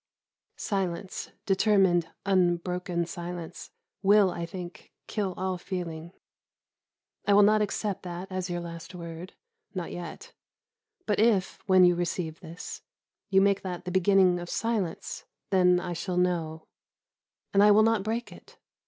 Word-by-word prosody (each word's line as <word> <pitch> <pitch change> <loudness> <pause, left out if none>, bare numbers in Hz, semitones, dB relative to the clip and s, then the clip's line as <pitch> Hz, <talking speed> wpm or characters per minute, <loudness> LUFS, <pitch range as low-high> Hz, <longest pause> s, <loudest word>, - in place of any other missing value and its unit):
Silence, 190 -2 -3 0.2
determined, 190 -4 +3 0.2
unbroken 180 -1 +1
silence, 175 -1 -7 0.3
will, 200 -1 +5
I 170 -1 -4
think, 175 0 -9
kill 200 -4 -2
all 185 -1 -2
feeling. 170 -3 -5 1.2
I 205 - +5
will 205 - +7
not 215 +1 +5
accept 205 -1 -2
that 180 +1 -7
as 185 -1 -3
your 175 0 -2
last 170 +1 -8
word, 170 +1 -8 0.4
not 180 -2 -4
yet; 175 -1 -8 0.7
but 210 -2 0
if, 210 -4 +2
when 185 -1 +7
you 175 - +5
receive 170 -2 -3
this, 170 -1 -8 0.5
you 195 -1 +5
make 200 0 +3
that 180 -2 -5
the 180 - -3
beginning 185 -1 +4
of 175 0 -7
silence, 215 -7 -2 0.3
then 180 -2 +5
I 180 -1 -4
shall 180 +2 -3
know, 165 -3 0 0.9
and 200 - +5
I 210 - +7
will 210 +1 +7
not 225 -2 +3
break 225 +4 -3
it. - - -15
180 Hz, 140 wpm, -28 LUFS, 175-195 Hz, 1.2 s, will